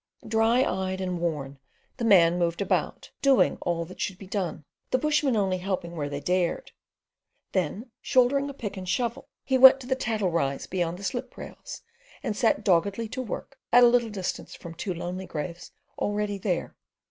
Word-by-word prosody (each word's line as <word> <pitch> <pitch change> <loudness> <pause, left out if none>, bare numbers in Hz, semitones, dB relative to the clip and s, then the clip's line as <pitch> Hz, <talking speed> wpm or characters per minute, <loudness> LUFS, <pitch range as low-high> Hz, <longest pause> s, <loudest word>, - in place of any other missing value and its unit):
Dry 225 +3 +3
eyed 190 -3 -2
and 180 -2 -2
worn, 145 -5 -3 0.4
the 240 - -4
man 175 -5 +5
moved 170 -1 0
about, 200 - -1
doing 275 -2 +4
all 170 -1 -1
that 180 - -10
should 190 - -2
be 195 - -11
done, 185 -6 -3 0.2
the - - +2
bushmen 300 -2 +1
only 190 -3 +1
helping 180 -2 -3
where 145 -3 -3
they 140 0 -4
dared; 180 +2 -1 0.8
then 190 - -2
shouldering 275 +2 +2
a - - -6
pick 205 -6 -6
and 185 -1 -6
shovel, 240 +5 -2
he 265 -1 +1
went 265 +1 +10
to - - -9
the 260 - +1
tattle 220 -7 -1
rise 140 -5 -1
beyond 175 -2 -2
the 200 - -11
slip 245 +5 -4
rails, - - -9 0.4
and 210 - -2
set 230 0 +2
doggedly 200 +5 +2
to 260 +3 -4
work 255 +3 -7
at 245 +1 +7
a - - +9
little 240 -1 +3
distance 190 -3 -5
from 170 -2 -9
two 185 +3 -4
lonely 180 +2 -5
graves 170 +3 -6 0.3
already 205 -1 -1
there. 180 -3 -2
195 Hz, 180 wpm, -27 LUFS, 175-240 Hz, 0.8 s, went